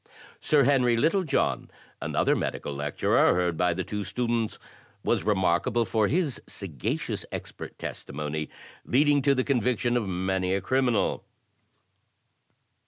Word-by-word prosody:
Sir 150 -2 +3
Henry 125 -3 +3
Littlejohn, 165 +5 +1 0.3
another - - +1
medical 70 - -3
lecturer, 70 +4 +2
heard 90 -1 +1
by 90 +1 +1
the 95 - -2
two 105 +3 -4
students, 115 +3 -1 0.5
was - - +1
remarkable 100 +3 +1
for 110 -1 +1
his 155 - 0
sagacious 80 -11 -4
expert - - -7
testimony, 75 +2 -5 0.3
leading 145 +2 +3
to 140 +1 +3
the 130 - +1
conviction 125 -2 +1
of 115 -4 0
many 95 +1 0
a - - +1
criminal. 125 +2 +1
110 Hz, 120 wpm, -27 LUFS, 90-130 Hz, 0.5 s, Sir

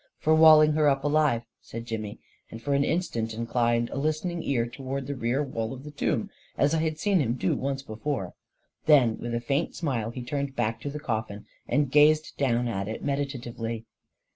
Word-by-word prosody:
44 - - -42
For 160 - +4
walling 155 -1 +8
her 150 -1 +3
up 135 -1 0
alive," 145 -5 +2 0.2
said 115 +1 -8
Jimmy, 110 -2 -5 0.3
and 115 - -8
for 140 +5 -2
an 140 0 +3
instant 120 -10 -1
inclined 115 0 0
a - - -4
listening 155 +4 -1
ear 120 -6 0
toward 135 +2 -5
the 140 - -3
rear 125 +2 0
wall 115 -4 -3
of 135 0 -9
the 150 - -8
tomb, 195 +7 -1 0.3
as 145 +2 +3
I 160 - +2
had 155 -1 -1
seen 195 +3 +2
him 120 -6 +1
do 95 -7 0
once 135 0 -3
before. 115 -4 -4 0.5
Then, 130 -7 +5
with 120 0 -3
a - - 0
faint 140 +7 -1
smile, 125 -9 -2
he 125 +1 -6
turned 140 +2 -3
back 115 -1 -1
to 145 - -4
the 150 +1 -5
coffin, 110 -6 -4 0.2
and 145 -2 +1
gazed 150 +2 +4
down 120 -3 +1
at 100 -4 -2
it 110 - -5
meditatively. 120 -5 -3
135 Hz, 200 wpm, -27 LUFS, 115-150 Hz, 0.5 s, walling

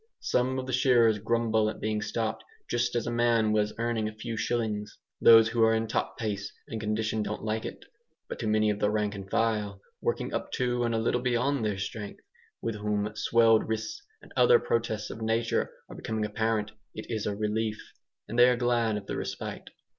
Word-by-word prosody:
Some 130 +1 +1
of 130 - -3
the 130 - -4
shearers 120 -4 +4
grumble 110 0 +1
at - - -7
being 110 0 -1
stopped 110 +1 -2 0.2
"just 120 0 0
as 120 - 0
a 120 - -2
man 120 -2 +2
was 105 0 +2
earning 115 -2 -1
a 110 - -12
few 115 +1 -5
shillings." 110 -2 -2 0.2
Those 115 -1 +8
who 115 0 0
are 110 0 +5
in 110 0 0
top 110 - -2
pace 105 -3 -3 0.2
and 110 - -5
condition 110 0 -1
don't 105 0 -4
like 110 0 -2
it. - - -7 0.4
But - - -6
to 115 - -2
many 110 0 +3
of 105 - -3
the 105 - +2
rank 105 0 0
and 95 -1 -8
file 105 -3 0 0.2
working - - -1
up - - -3
to 125 -1 0
and 115 -1 0
a - - +1
little 120 +2 +1
beyond 125 +1 +1
their 105 -3 -1
strength 100 +1 -6 0.4
with 115 -2 -2
whom 105 0 -1
swelled 115 0 +4
wrists 335 - -3 0.2
and - - -15
other 475 0 +6
protests 115 - -1
of 110 - -8
nature 115 +1 0 0.2
are - - -10
becoming 110 -1 -2
apparent, 105 0 -1 0.2
it 110 - -6
is 110 -3 -2
a 105 - -1
relief, 105 +1 -1 0.5
and 115 +3 -2
they 125 +1 +8
are 125 - +2
glad 120 -3 +1
of 100 - -7
the - - -4
respite. - - -5
110 Hz, 205 wpm, -28 LUFS, 105-115 Hz, 0.5 s, Those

